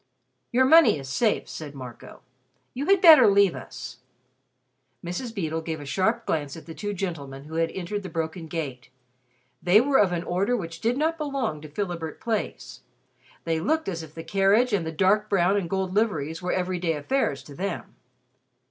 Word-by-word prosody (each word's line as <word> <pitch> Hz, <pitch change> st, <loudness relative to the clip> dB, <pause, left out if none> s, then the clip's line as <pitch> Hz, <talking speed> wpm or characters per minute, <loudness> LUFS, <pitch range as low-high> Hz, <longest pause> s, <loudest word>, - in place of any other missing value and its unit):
"Your 260 Hz, +2 st, +4 dB
money 320 Hz, -, +6 dB
is 135 Hz, -1 st, -8 dB
safe," 215 Hz, -, +1 dB
said 145 Hz, -3 st, -8 dB
Marco. 125 Hz, -3 st, -10 dB, 0.5 s
"You 275 Hz, +4 st, -4 dB
had 390 Hz, -1 st, +4 dB
better 315 Hz, -, +9 dB
leave 200 Hz, -2 st, +5 dB
us." -, -, -8 dB, 1.1 s
Mrs. 180 Hz, +8 st, -4 dB
Beedle 165 Hz, -7 st, -3 dB
gave 160 Hz, -1 st, -4 dB
a 145 Hz, -, -8 dB
sharp 220 Hz, -, 0 dB
glance 145 Hz, -2 st, -2 dB
at 160 Hz, -, -11 dB
the 165 Hz, -, -8 dB
two 205 Hz, +4 st, -4 dB
gentlemen 145 Hz, -8 st, -5 dB
who 155 Hz, +2 st, -11 dB
had 165 Hz, 0 st, +1 dB
entered 190 Hz, +4 st, -4 dB
the 190 Hz, -, -7 dB
broken 160 Hz, +1 st, -4 dB
gate. 140 Hz, -8 st, -5 dB, 0.7 s
They 180 Hz, +5 st, +6 dB
were 270 Hz, +3 st, +3 dB
of 195 Hz, -3 st, +4 dB
an 175 Hz, -1 st, -2 dB
order 195 Hz, +8 st, 0 dB
which 165 Hz, -5 st, -7 dB
did 235 Hz, +3 st, +1 dB
not 320 Hz, +2 st, 0 dB
belong 275 Hz, -, -2 dB
to 155 Hz, -, -10 dB
Philibert 170 Hz, -2 st, -4 dB
Place. 205 Hz, -, -4 dB, 0.6 s
They 165 Hz, -1 st, 0 dB
looked 315 Hz, -, 0 dB
as 170 Hz, -4 st, -3 dB
if 160 Hz, -1 st, -12 dB
the 165 Hz, -, -7 dB
carriage 200 Hz, +7 st, +3 dB
and 175 Hz, -5 st, 0 dB
the -, -, -2 dB
dark 200 Hz, +5 st, +2 dB
brown 190 Hz, 0 st, +3 dB
and 190 Hz, -5 st, -1 dB
gold 190 Hz, -1 st, -2 dB
liveries 165 Hz, -7 st, 0 dB
were 180 Hz, -, -2 dB
every 185 Hz, 0 st, -1 dB
day 170 Hz, -2 st, 0 dB
affairs 150 Hz, -, -1 dB
to 145 Hz, -, -12 dB
them. 185 Hz, +3 st, -5 dB
180 Hz, 185 wpm, -25 LUFS, 160-215 Hz, 1.1 s, better